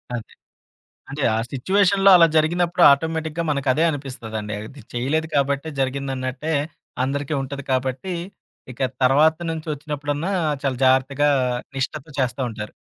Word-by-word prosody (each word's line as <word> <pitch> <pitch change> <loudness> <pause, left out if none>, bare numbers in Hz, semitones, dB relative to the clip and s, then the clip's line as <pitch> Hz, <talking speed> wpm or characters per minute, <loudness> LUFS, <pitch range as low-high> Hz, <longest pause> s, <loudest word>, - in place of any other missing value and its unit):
అదే. 115 - -8 0.8
అంటే, 145 0 -4
ఆ - - +1
సిట్యుయేషన్‌లో 195 +7 +3
అలా 165 -1 +7
జరిగినప్పుడు 175 +2 +2
ఆటోమేటిక్‌గా 160 +2 -1
మనకదే 140 +2 +1
అనిపిస్తదండి. 120 -8 -5
అది 140 +3 -13
చేయలేదు 145 +7 0
కాబట్టే 140 +2 0
జరిగిందన్నట్టే, 135 +2 -2 0.5
అందరికీ 145 +3 -2
ఉంటది 140 +1 -6
కాబట్టి 130 +7 -1 0.6
ఇక 125 - -10 0.2
తర్వాత 150 +5 +4
నుంచి 160 0 -6
వచ్చినప్పుడన్నా, 145 +4 -3 0.3
చాలా 135 -2 0
జాగ్రత్తగా 135 +3 +3 0.5
నిష్టతో 145 +3 -3
చేస్తా 125 0 -1
ఉంటారు. 105 -1 -7
140 Hz, 115 wpm, -22 LUFS, 130-160 Hz, 0.8 s, అలా